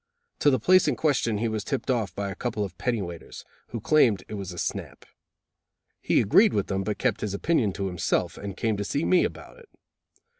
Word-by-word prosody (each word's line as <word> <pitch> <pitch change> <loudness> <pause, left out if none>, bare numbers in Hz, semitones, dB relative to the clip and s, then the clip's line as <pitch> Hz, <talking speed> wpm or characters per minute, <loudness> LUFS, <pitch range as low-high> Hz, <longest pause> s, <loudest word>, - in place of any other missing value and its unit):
To 145 - +4
the 130 -3 +2
place 185 +7 +4
in 145 - +2
question 125 -8 +1
he 115 +3 0
was 110 -2 -2
tipped 135 +1 -2
off 110 -7 -1
by 100 -1 -3
a - - -7
couple 110 0 -2
of 95 -3 -6
penny 120 -5 -1
weighters, 85 -2 -9 0.2
who 115 - -5
claimed 115 -6 +3
it - - -8
was 100 -3 -5
a 90 - -9
snap. - - -4 1.0
He - - +2
agreed 200 - +5
with 100 - +1
them, 95 -1 -2
but 105 +1 -3
kept - - 0
his 100 -2 -2
opinion 120 -3 +1
to 100 - -3
himself, 90 -1 -1
and 100 -1 -7
came 110 -2 0
to 100 - -2
see 140 +9 -1
me 185 - +4
about - - -6
it. 465 - -18
105 Hz, 220 wpm, -26 LUFS, 100-130 Hz, 1.0 s, agreed